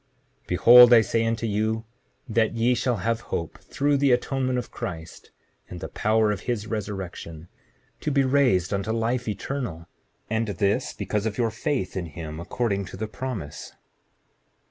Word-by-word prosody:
Behold 120 +7 +8
I 115 - +8
say 115 +1 0
unto 115 0 -1
you 110 +1 -1 0.4
that 110 -1 +1
ye 115 +2 +3
shall 125 0 0
have 115 0 0
hope 85 -2 -4
through 145 0 0
the 140 -1 +3
atonement 130 +1 0
of 125 - -4
Christ 80 -1 -7 0.4
and 90 - -7
the - - -6
power 110 0 +2
of 105 - -2
his 110 -4 -1
resurrection, 95 -6 -6 0.5
to - - -2
be 140 -1 +3
raised 130 -10 +2
unto 100 +2 -1
life 115 +2 -1
eternal, 105 - -4 0.4
and 110 +1 -1
this 100 0 0
because 105 +1 -2
of 105 - -4
your 115 -2 +1
faith 115 -3 -2
in 90 -3 -3
him 80 0 -7
according 100 +2 -2
to 95 0 -9
the 110 +2 -3
promise. 110 - -6
110 Hz, 160 wpm, -25 LUFS, 95-120 Hz, 0.5 s, Behold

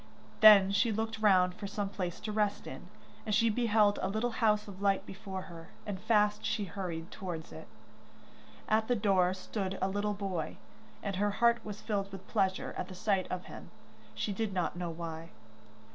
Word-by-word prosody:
Then 205 -3 +9
she 205 +3 +2
looked 225 +1 -2
round 185 -4 +4
for 200 +2 -6
some 205 0 -2
place 185 -3 -4
to 215 - -4
rest 210 -1 0
in, - - -8 0.4
and 215 -2 0
she 230 +1 +4
beheld 215 -3 +3
a 190 - 0
little 220 +4 -1
house 215 -2 +2
of 195 -1 -10
light 195 -1 +2
before 195 -1 -6
her, 165 -2 -11 0.2
and 205 -3 -4
fast 210 0 +2
she 210 - -1
hurried 175 -3 -5
towards 175 -5 -6
it. - - -10 1.0
At 220 0 +2
the 245 - +2
door 190 -4 +2
stood 190 0 -4
a 190 - +1
little 205 +1 -1
boy, 190 -5 -3 0.5
and 195 -2 -2
her 205 +1 +2
heart 235 0 +3
was 210 -1 -7
filled 200 -2 -2
with 195 -1 -9
pleasure 190 -3 0
at - - -3
the 185 - -9
sight 195 -1 0
of 185 0 -4
him, - - -10 0.5
she 205 - -2
did 210 0 -2
not 180 -2 -1
know 175 -1 -3
why. 165 0 -6
200 Hz, 190 wpm, -32 LUFS, 185-215 Hz, 1.0 s, Then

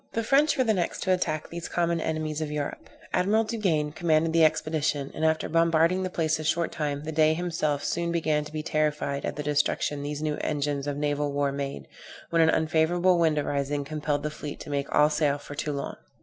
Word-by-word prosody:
The 230 - -1
French 285 +5 +3
were 260 - +4
the 225 -3 +2
next 175 -4 -2
to 185 - +3
attack 155 -4 -1
these 170 0 -6
common 170 -1 0
enemies 155 -1 -2
of 155 - -2
Europe. 150 -1 -4 0.2
Admiral 205 +5 +3
Duguesne 185 -10 0
commanded 160 -1 +2
the 165 -1 +5
expedition, 155 -2 +1
and 155 - -4
after 160 0 +2
bombarding 165 +2 +3
the 185 - -2
place 160 -3 0
a - - -4
short 165 +2 0
time, 145 -1 -3
the 155 - -4
Dey 155 0 +3
himself 160 -4 -1
soon 170 0 -1
began 155 -3 +1
to 150 - -10
be 155 0 -4
terrified 150 -2 -1
at - - -3
the 150 - -4
destruction 145 0 0
these 145 +1 -4
new 150 -1 -1
engines 145 -1 -2
of 145 -1 -2
naval 145 0 0
war 140 0 0
made, 140 - -5 0.4
when 165 -1 +4
an 160 - +5
unfavorable 170 +3 +2
wind 160 -2 +3
arising, 145 0 -1
compelled 150 -1 -2
the 150 - -2
fleet 150 -1 -7
to - - -7
make 140 -1 -2
all 150 +1 +4
sail 150 -2 +1
for 145 - -10
Toulon. 145 -1 -4
155 Hz, 210 wpm, -27 LUFS, 145-165 Hz, 0.4 s, the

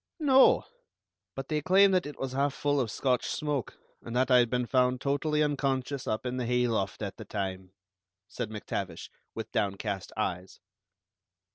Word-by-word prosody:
"No; 270 -4 +6 0.7
but 135 0 -5
they 150 -1 -1
claimed 190 +4 +5
that 180 -4 +2
it 150 - -9
was 135 -1 -4
half 140 +1 0
full 145 -1 +1
of 120 - -2
Scotch 125 +3 0
'smoke,' 145 -6 -2 0.2
and 115 - -7
that 130 +1 +2
I 125 - +7
had 120 -1 +3
been 125 0 0
found 125 0 +2
totally 150 +3 +1
unconscious 140 -2 -1
up 110 +3 -2
in 125 0 -2
the 125 -2 -2
hayloft 115 -5 0
at 100 - -5
the - - -7
time," 95 -2 -4 0.5
said 120 -4 -5
MacTavish, 105 -1 -5 0.2
with - - -6
downcast 100 -1 -2
eyes. 90 +2 -3
125 Hz, 165 wpm, -29 LUFS, 110-145 Hz, 0.7 s, I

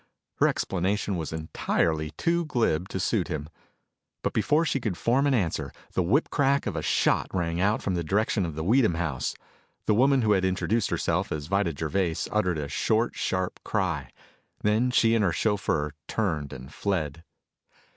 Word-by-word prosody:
Her - - +4
explanation 95 +2 -1
was 80 -3 -4
entirely 80 0 -1
too 170 0 +1
glib 105 - 0
to 95 - -3
suit 100 -1 0
him. 75 0 -4 0.7
But - - -1
before 150 +9 +2
she 140 - 0
could 110 -8 -2
form 135 +4 +2
an 140 - +3
answer, 90 -9 -1 0.2
the - - +1
whip 110 - +2
crack 140 -1 +2
of - - -2
a - - -1
shot - - +2
rang 85 -2 -1
out 105 +3 +1
from 95 - 0
the 85 -1 -1
direction 100 +4 +1
of 80 -4 -4
the 80 - -3
Weedham 110 -1 +3
house. 80 -6 -2 0.5
The 110 - +3
woman 130 +3 +4
who 110 - +3
had 95 -2 +3
introduced 95 +4 +1
herself - - 0
as 75 -2 -3
Vida 95 -2 0
Gervais 80 +2 0
uttered 90 -6 +1
a 75 -2 -3
short, 110 +9 +1
sharp 95 -1 -2
cry. 85 - -1 0.5
Then 110 +4 +3
she 115 -2 +4
and 115 -2 +3
her 95 - +3
chauffeur 90 -6 0 0.2
turned 80 -10 -1
and 65 +1 -9
fled. 85 -5 -2
95 Hz, 175 wpm, -27 LUFS, 80-110 Hz, 0.7 s, Her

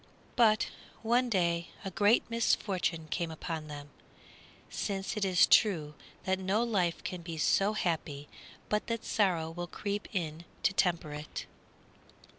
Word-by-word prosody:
But 220 -3 +4 0.3
one 240 +2 +3
day 170 -4 +1 0.2
a 195 - -3
great 205 +5 +3
misfortune 190 -7 0
came 170 -1 -1
upon 160 -1 -5
them, 145 -1 -8 0.8
since 195 0 -3
it 210 - -1
is 185 -2 +5
true 160 -9 +4 0.3
that 190 0 0
no 195 +4 +1
life 190 -8 0
can 180 -1 -4
be 165 -1 -6
so 195 +6 +3
happy 155 -7 -2 0.4
but 210 0 0
that 230 -1 -3
sorrow 175 -6 +1
will 175 +1 -5
creep 205 +3 -4
in 165 -3 -3 0.2
to - - +3
temper 170 -5 +1
it. 150 0 -6
185 Hz, 140 wpm, -31 LUFS, 165-210 Hz, 0.8 s, is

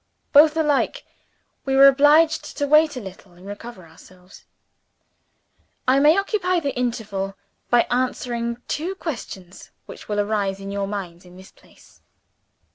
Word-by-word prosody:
Both 305 +2 +6
alike, 310 - 0 0.6
we 270 -1 -1
were 275 +1 +8
obliged 300 +3 +3
to 285 - 0
wait 305 -1 +3
a - - -3
little 190 -3 -12
and 180 +2 -17
recover 205 -1 -10
ourselves. 180 +3 -18 1.4
I 260 +2 +4
may 300 +4 +5
occupy 390 -3 0
the 285 -4 -3
interval 205 -5 -3 0.3
by 240 -1 +4
answering 245 -1 -2
two 350 +6 -3
questions 195 - -8 0.2
which - - -12
will 205 0 -1
arise 205 -2 -1
in 195 0 -7
your 200 0 -3
minds 185 -4 -7
in 180 0 -16
this 190 +1 -15
place. - - -23
240 Hz, 140 wpm, -22 LUFS, 195-295 Hz, 1.4 s, were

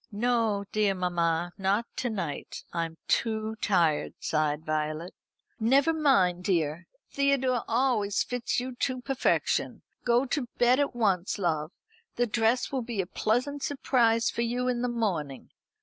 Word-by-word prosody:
"No, 220 -2 +1
dear 210 -2 +2
mamma; 175 -1 0
not 195 +4 +1
to 245 - -1
night, 190 -10 -5
I'm 165 -1 -3
too 220 -1 0
tired," 170 -8 +1
sighed 155 0 -1
Violet. 155 +2 -2 0.5
"Never 270 +8 +4
mind, 195 - +3
dear. 170 -2 0 0.2
Theodore 265 -3 +1
always 230 -4 +1
fits 245 -1 -2
you 255 +1 -5
to 255 -1 -1
perfection. 270 0 0 0.2
Go 240 +2 +3
to 270 -1 -2
bed 245 +2 +4
at 285 -3 0
once, 195 -6 +1
love. 160 -4 -1 0.4
The 245 - +2
dress 230 +2 +1
will 265 -2 -1
be 230 -3 -5
a 190 - +1
pleasant 250 +9 -1
surprise 235 -5 +2
for - - -3
you 245 +2 -1
in 245 -1 0
the 250 - 0
morning. 180 - -2
220 Hz, 145 wpm, -28 LUFS, 175-245 Hz, 0.5 s, Never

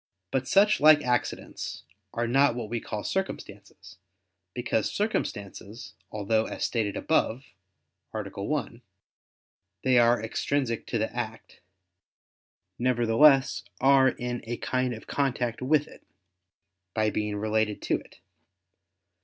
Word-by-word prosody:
But 130 0 -1
such 200 +8 +4
like 150 0 +7
accidents 125 0 -2 0.3
are 120 0 -1
not 135 +1 +3
what 115 -3 -5
we 120 - -1
call 105 -1 -5
circumstances; 100 - -5 0.6
because 120 -3 0
circumstances 105 - -4 0.2
although, 110 +1 0
as - - -5
stated 110 -4 -1
above 125 +5 0 0.7
(A. 110 - -4 0.2
1), 125 -2 -3 1.0
they 130 -2 +4
are 120 +1 +4
extrinsic 115 +2 -2
to 120 - -1
the 110 +2 -2
act, 115 -2 -6 1.2
nevertheless 130 +3 +4 0.2
are 135 0 +5
in 120 -1 -4
a 120 0 -3
kind 125 -1 -1
of 110 - -12
contact 125 -4 -1
with 150 +3 +2
it, - - -16 0.9
by 110 -1 +2
being 105 0 -2
related 110 0 0
to - - +1
it. - - -19
120 Hz, 120 wpm, -27 LUFS, 110-135 Hz, 1.2 s, like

